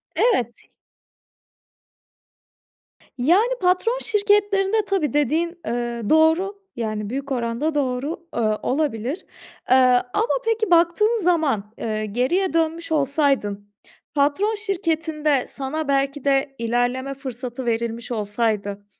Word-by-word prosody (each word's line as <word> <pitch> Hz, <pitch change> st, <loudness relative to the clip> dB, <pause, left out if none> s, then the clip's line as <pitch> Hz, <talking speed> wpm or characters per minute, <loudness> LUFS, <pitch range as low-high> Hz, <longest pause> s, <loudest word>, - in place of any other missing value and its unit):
Evet. 245 Hz, -, +1 dB, 2.5 s
Yani, 365 Hz, -, +3 dB
patron 375 Hz, +7 st, +2 dB
şirketlerinde, 410 Hz, -1 st, +2 dB
tabii, 370 Hz, -8 st, 0 dB
dediğin, 310 Hz, +4 st, +1 dB, 0.2 s
eee, 235 Hz, 0 st, -2 dB
doğru. 325 Hz, +6 st, +3 dB, 0.2 s
Yani, 215 Hz, -3 st, -3 dB
büyük 275 Hz, +3 st, -4 dB
oranda 245 Hz, +5 st, -1 dB
doğru, 285 Hz, +4 st, -2 dB
ııı, 215 Hz, -2 st, +1 dB
olabilir. 270 Hz, -, -1 dB, 0.4 s
Eee, 255 Hz, -, +6 dB, 0.4 s
ama 445 Hz, +3 st, +1 dB
peki, 450 Hz, -3 st, 0 dB
baktığın 350 Hz, +7 st, +4 dB
zaman, 280 Hz, -, +1 dB
eee, 215 Hz, -1 st, -2 dB
geriye 265 Hz, -, 0 dB
dönmüş 330 Hz, 0 st, -1 dB
olsaydın, 275 Hz, -9 st, 0 dB, 0.4 s
patron 300 Hz, +10 st, +1 dB
şirketinde 320 Hz, -, -1 dB
sana 285 Hz, +3 st, -4 dB
belki 275 Hz, 0 st, 0 dB
de 275 Hz, 0 st, +1 dB
ilerleme 245 Hz, +3 st, -1 dB
fırsatı 255 Hz, -2 st, -6 dB
verilmiş 235 Hz, +1 st, -2 dB
olsaydı 205 Hz, -2 st, -2 dB
280 Hz, 100 wpm, -22 LUFS, 240-345 Hz, 2.5 s, Eee